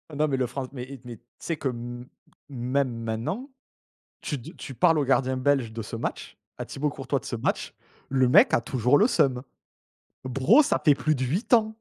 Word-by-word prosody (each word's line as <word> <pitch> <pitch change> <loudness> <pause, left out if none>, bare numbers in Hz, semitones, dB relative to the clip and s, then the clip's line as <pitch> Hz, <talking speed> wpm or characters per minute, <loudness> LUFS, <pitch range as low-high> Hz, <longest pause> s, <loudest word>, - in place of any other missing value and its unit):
Non 155 +2 +2
mais 135 -3 0
le 125 - 0
franc 130 +1 -5
mais 125 -3 -6
et 130 -1 -10
mais 120 -2 -8
tu - - -34 0.2
sais 165 - -3
que 140 - -2
m 120 0 -7 0.4
même 130 0 -1
maintenant 115 - -3 0.7
tu 145 - -3
d 120 - -10
tu 135 - -8
parles 165 +4 +3
au 145 - +1
gardien 130 -1 +1
belge 130 -3 +1
de 115 - -5
ce 110 - -7
match, 115 - -5 0.2
à - - -5
Thibault 150 +2 -2
Courtois 140 0 -3
de - - -16
ce - - -3
match, 115 - -2 0.4
le 130 -1 +3
mec - - +6
a - - +4
toujours 125 +3 +2
le 215 - +5
seum. 135 - +1 0.8
Bro 130 - +4
ça - - 0
fait 150 -4 +6
plus 155 +2 0
de 130 -2 -2
8 180 - -2
ans. 220 -1 +2
130 Hz, 215 wpm, -26 LUFS, 125-145 Hz, 0.8 s, mec